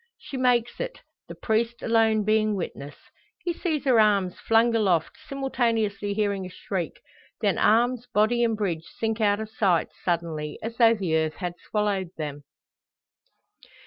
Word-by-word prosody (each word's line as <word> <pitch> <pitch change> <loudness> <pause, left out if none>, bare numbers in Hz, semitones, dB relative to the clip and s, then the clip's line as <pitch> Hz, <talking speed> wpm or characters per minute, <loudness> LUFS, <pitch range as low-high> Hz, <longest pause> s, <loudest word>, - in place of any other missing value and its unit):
She - - -9
makes 245 -2 +1
it, - - -5 0.3
the - - -8
priest 230 +1 -1
alone 225 -2 +3
being 215 0 +2
witness. 145 -6 -6 0.5
He 345 - -1
sees 315 -5 -2
her 250 -4 +5
arms 200 -4 +2
flung 225 +1 +3
aloft, 190 - +1
simultaneously 225 -7 -1
hearing 200 -2 0
a 180 - -6
shriek; 185 -1 -5 0.4
then - - +1
arms, 240 +2 +3
body, 230 +2 +3
and 225 -2 +1
bridge 170 -6 -2
sink 225 0 -1
out 205 -1 +3
of 220 0 -6
sight 185 -7 +1
suddenly, 165 -4 -2
as 230 +1 -5
though 230 -1 +6
the 185 -7 -1
earth 160 -1 0
had 180 -2 -4 0.2
swallowed 205 -4 0
them! 145 -2 -5
215 Hz, 150 wpm, -25 LUFS, 185-230 Hz, 0.5 s, though